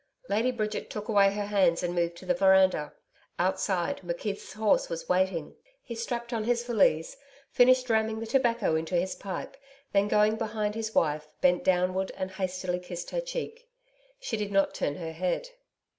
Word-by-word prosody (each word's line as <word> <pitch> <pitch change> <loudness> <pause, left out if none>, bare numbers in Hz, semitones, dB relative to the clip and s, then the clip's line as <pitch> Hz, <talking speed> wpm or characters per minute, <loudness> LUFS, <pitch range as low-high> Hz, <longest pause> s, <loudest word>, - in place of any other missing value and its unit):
Lady 220 +5 +2
Bridget 215 -4 -3
took 210 +1 -6
away 200 -2 +5
her 205 0 -3
hands 190 -4 +2
and 175 0 -1
moved 170 -1 -1
to - - -11
the 270 - +2
veranda. 190 - +4 0.5
Outside, 190 -1 0
McKeith's 180 +4 -4
horse 215 -1 +2
was 165 0 -5
waiting. 180 -3 0 0.3
He 235 - -7
strapped 235 +1 -4
on 225 -2 -1
his 240 0 +1
valise, 190 -9 +2 0.4
finished 255 +1 +5
ramming 220 -1 +1
the 225 - -4
tobacco 235 -7 +1
into 160 +3 -2
his 180 +2 +1
pipe, 190 +5 -6 0.4
then 200 0 +3
going 210 +1 +3
behind 215 -1 -2
his 220 0 -4
wife, 150 -1 +1
bent 180 -1 +3
downward 185 +1 +1
and 190 0 -3
hastily 185 -1 -2
kissed 180 -1 -7
her - - -1
cheek. - - -6 0.5
She 255 - -3
did 210 -1 -3
not 195 0 +2
turn 145 - -2
her 165 -1 -5
head. 185 - -2
200 Hz, 175 wpm, -28 LUFS, 180-225 Hz, 0.5 s, away